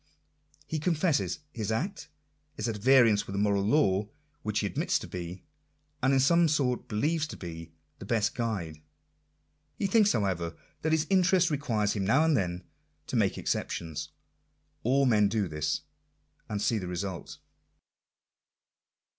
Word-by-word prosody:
He 160 - -3
con 165 +2 +1
fesses 155 -1 0
his 110 -4 -3
act 180 - -3 0.5
is - - -2
at 110 -2 -2
variance 115 -3 +5
with 95 - -5
the - - 0
moral 100 -1 +2
law, 100 -3 +2 0.3
which 105 -4 -1
he - - -1
ad 100 - -4
mits - - +1
to - - -7
be, 90 +1 -7 0.6
and 130 +1 +3
in 135 - +4
some 170 +5 +4
sort 135 -5 0
believes 150 +9 0
to - - -8
be, 85 -2 -8 0.3
the - - -8
best 115 0 +1
guide. 95 -10 -3 1.0
He - - -1
thinks, 210 +1 +4
however, 85 -5 -1 0.2
that 160 - 0
his 160 -1 +2
interest 185 -2 +4
requires 115 -8 0
him 100 - -2
now 135 +11 +4
and 160 -2 +3
then 90 -5 -1 0.4
to - - -5
make - - +2
exceptions. 75 -2 -3 0.7
All 135 +4 +3
men 105 -5 +4
do 105 -2 0
this; 75 -1 -2 0.3
— - - -42
and 105 - -2
see 110 +2 +1
the 90 - -5
result. 90 -2 -5
110 Hz, 160 wpm, -29 LUFS, 95-150 Hz, 1.0 s, variance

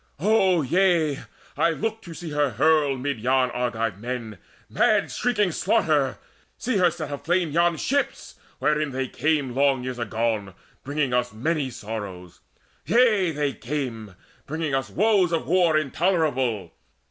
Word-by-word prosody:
O 190 -3 +3
yea, 165 -1 +2 0.4
I 170 - +3
look 220 +7 -3
To 170 -5 -10
see 165 0 -7
her 145 -1 +1
hurl 145 +3 +2
amid 130 -1 -3
yon 130 +2 +2
Argive 115 -5 -2
men 115 -4 -5 0.3
Mad - - +2
shrieking 210 -6 +1
slaughter, 145 -4 +1 0.4
see 250 -3 -1
her 180 -2 +4
set 155 -3 -6
aflame 170 +3 0
Yon 170 +1 +2
ships 280 - -2 0.2
wherein 150 -2 0
they 130 0 -2
came 145 -2 0
long 135 -1 +2
years 125 -1 -5
agone 110 -4 -2 0.3
Bringing 140 -2 -1
us 125 0 +1
many 140 +4 -1
sorrows, 100 -6 -7 0.4
yea, 215 - +3
they 145 -3 -1
came 120 -7 -5 0.3
Bringing 155 -1 -3
us 135 0 -1
woes 200 -3 +2
of 165 - -1
war 170 -2 +3
intolerable. 140 - 0
145 Hz, 140 wpm, -24 LUFS, 125-170 Hz, 0.4 s, her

